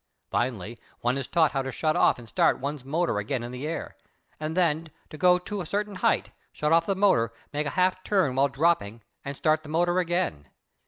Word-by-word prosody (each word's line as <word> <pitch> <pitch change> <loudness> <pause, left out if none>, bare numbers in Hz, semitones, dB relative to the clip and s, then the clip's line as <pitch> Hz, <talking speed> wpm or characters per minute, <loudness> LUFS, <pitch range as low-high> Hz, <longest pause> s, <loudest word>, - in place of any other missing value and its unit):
Finally 115 -2 -2 0.2
one 120 +2 +1
is 135 -2 -3
taught 165 -2 +3
how 135 - 0
to 135 0 -4
shut 155 +3 0
off - - +4
and 120 -2 -12
start - - +2
one's 140 0 -4
motor 155 -4 0
again 120 +4 -2
in 120 - -6
the 125 +4 -5
air, 165 - -5 0.4
and 155 +2 -4
then 165 -2 +1 0.2
to - - -8
go 180 +3 +5
to 195 +2 -5
a - - -5
certain 205 +2 -2
height, 230 +2 +1 0.2
shut 150 +1 -1
off 165 0 +4
the 195 - +1
motor, 185 - +3 0.2
make 150 0 -1
a 140 - -5
half 185 0 +2
turn 185 -10 +2
while 135 +2 +3
dropping 135 -7 0 0.2
and 140 0 -6
start 155 0 +2
the 155 - -12
motor 175 +3 +2
again. 170 - -1
155 Hz, 215 wpm, -27 LUFS, 130-175 Hz, 0.4 s, go